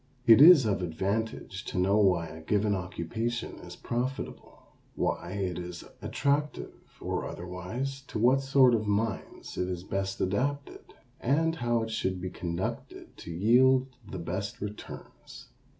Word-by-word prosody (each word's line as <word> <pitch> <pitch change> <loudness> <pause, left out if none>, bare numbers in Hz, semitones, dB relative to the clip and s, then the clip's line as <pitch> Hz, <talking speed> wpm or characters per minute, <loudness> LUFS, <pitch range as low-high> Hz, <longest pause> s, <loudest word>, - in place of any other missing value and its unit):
It 115 +2 +8
is 155 -5 +9
of 100 -3 0
advantage 100 +6 -3
to - - -5
know 95 +3 +3
why 90 -5 +3
a 80 0 -9
given 105 +5 +1
occupation 100 +6 -3
is - - -10
profitable, 125 +3 -4 0.3
why 90 - -2
it 95 -3 -2
is 90 -1 -7 0.2
attractive 145 +1 -1 0.3
or - - -3
otherwise, 95 +11 -5
to - - -5
what 125 +5 +4
sort 135 -2 +5
of 110 -2 0
minds 105 +1 -2
it 90 - 0
is 90 -1 -4
best 95 0 -3
adapted, 140 +9 -2 0.2
and 160 +6 +1
how 120 -3 +1
it 110 - -5
should 95 -4 -1
be 90 0 -5
conducted 85 0 -5
to - - -10
yield 130 +8 +4 0.2
the 95 - -5
best 95 +6 -4
returns. 105 +1 -9
105 Hz, 145 wpm, -29 LUFS, 90-125 Hz, 0.3 s, is